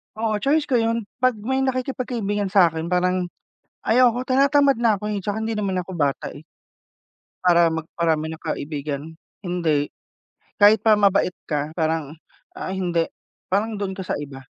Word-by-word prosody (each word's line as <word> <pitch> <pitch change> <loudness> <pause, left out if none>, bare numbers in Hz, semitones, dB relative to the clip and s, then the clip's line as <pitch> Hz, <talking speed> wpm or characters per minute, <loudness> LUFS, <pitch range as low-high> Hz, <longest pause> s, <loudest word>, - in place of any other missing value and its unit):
Oo, 215 -1 -1
choice 290 +5 +2
ko 260 -5 +1
yun, 230 0 0 0.2
pag 255 -2 +3
may 260 +6 -2
nakikipagkaibigan 250 -6 -1
sa'kin 170 -4 +3
parang 180 0 +1 0.6
ayoko 245 +1 +3
tinatamad 275 -1 +3
na 220 -3 +3
ako, 210 - -7
eh, 200 - -2
'tsaka 205 +2 -3
hindi 220 +1 -2
naman 200 -3 -1
ako 180 +1 -4
bata, 145 -5 -1
eh 145 - -11 1.0
para 170 -1 +5
magparami 160 -1 -1
ng 160 - -9
kaibigan. 145 -1 -3 0.4
Hindi. 165 -5 0 0.7
Kahit 205 0 +7
pa 220 -1 +6
mabait 200 -2 +3
ka 150 0 -2
parang 160 -3 -1 0.4
ah, 185 - -4
hindi. 175 -3 0 0.4
Parang 210 +2 0
dun 195 -2 -3
ka 190 - -5
sa - - -2
iba. 135 -2 -9
195 Hz, 150 wpm, -23 LUFS, 165-225 Hz, 1.0 s, Kahit